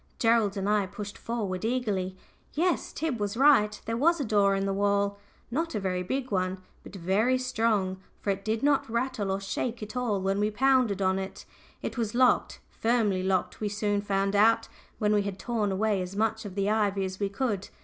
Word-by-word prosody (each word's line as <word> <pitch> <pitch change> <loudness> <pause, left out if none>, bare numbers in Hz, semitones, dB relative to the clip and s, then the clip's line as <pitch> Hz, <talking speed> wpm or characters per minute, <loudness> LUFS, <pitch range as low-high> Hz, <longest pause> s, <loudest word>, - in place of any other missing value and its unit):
Gerald 225 -4 +2
and 195 0 -1
I 210 -2 +2
pushed 205 +1 -7
forward 205 -6 -3
eagerly. 210 -6 -1 0.4
Yes, 345 +3 0
Tib 300 -7 -2
was 205 +2 -2
right. 245 -7 +5
There 230 - -2
was 330 +7 +3
a 280 - -1
door 200 -2 +3
in 195 0 -1
the 195 - 0
wall 200 0 +1 0.3
not 325 +2 -1
a - - 0
very 185 -2 -1
big 260 +7 -3
one, 185 -1 0 0.2
but - - -12
very 200 +8 +2
strong, 220 -7 0 0.2
for 200 - 0
it 195 0 -4
did 220 +2 -1
not 285 -4 +2
rattle 235 -3 -1
or 190 0 0
shake 220 +4 -3
at 215 +3 -8
all 240 -5 0
when 195 +1 0
we 210 +1 +2
pounded 245 -3 +2
on 190 0 +2
it. 190 0 -7 0.4
It - - -4
was 225 -1 -2
locked, 255 0 +3
firmly 225 -5 +1
locked 185 -1 0
we 210 - 0
soon 205 0 0
found 195 0 0
out, 220 +3 +4 0.3
when 210 -1 +2
we 205 - +3
had 200 -1 -4
torn 215 -2 -1
away 205 0 +1
as 180 +2 -6
much 220 +1 0
of 195 -2 -7
the 200 0 0
ivy 205 -2 +1
as 185 0 -6
we 200 -1 0
could. 205 -2 -2
210 Hz, 205 wpm, -28 LUFS, 195-230 Hz, 0.4 s, right